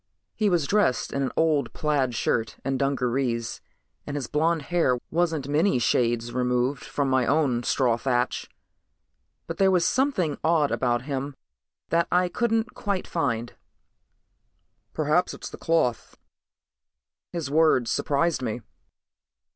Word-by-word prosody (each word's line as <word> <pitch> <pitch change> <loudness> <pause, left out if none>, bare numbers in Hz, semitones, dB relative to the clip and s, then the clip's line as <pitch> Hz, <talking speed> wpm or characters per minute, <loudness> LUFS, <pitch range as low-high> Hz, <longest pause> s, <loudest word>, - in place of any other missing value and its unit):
He 215 -2 +1
was 175 -5 +1
dressed 200 -6 +1
in 140 - -1
an 135 - -1
old 155 -3 +1
plaid 140 -5 0
shirt 115 +1 -1
and 135 -1 -1
dungarees 125 -3 -1 0.5
and 145 - -4
his 140 - -3
blond 160 +3 0
hair 165 -6 +1
wasn't 165 -5 0
many 155 +4 +2
shades 120 0 +1
removed 125 +1 0
from 140 -1 -2
my 130 -2 +2
own 140 -4 +2
straw 120 -1 +1
thatch. 125 0 -1 1.0
But 165 - -6
there 195 -1 +5
was 180 -2 +3
something 255 - 0
odd 160 -3 +2
about 120 -1 0
him 140 0 -4 0.5
that 170 0 +2
I 180 0 +3
couldn't 225 +3 0
quite 200 -4 -2
find. 120 -8 -2 1.4
"Perhaps 155 +4 +1
it's - - -8
the - - -10
cloth." 160 -8 0 1.1
His 160 -5 -4
words 150 -7 +3
surprised 150 +2 0
me. 120 -1 -3
145 Hz, 130 wpm, -25 LUFS, 125-170 Hz, 1.4 s, there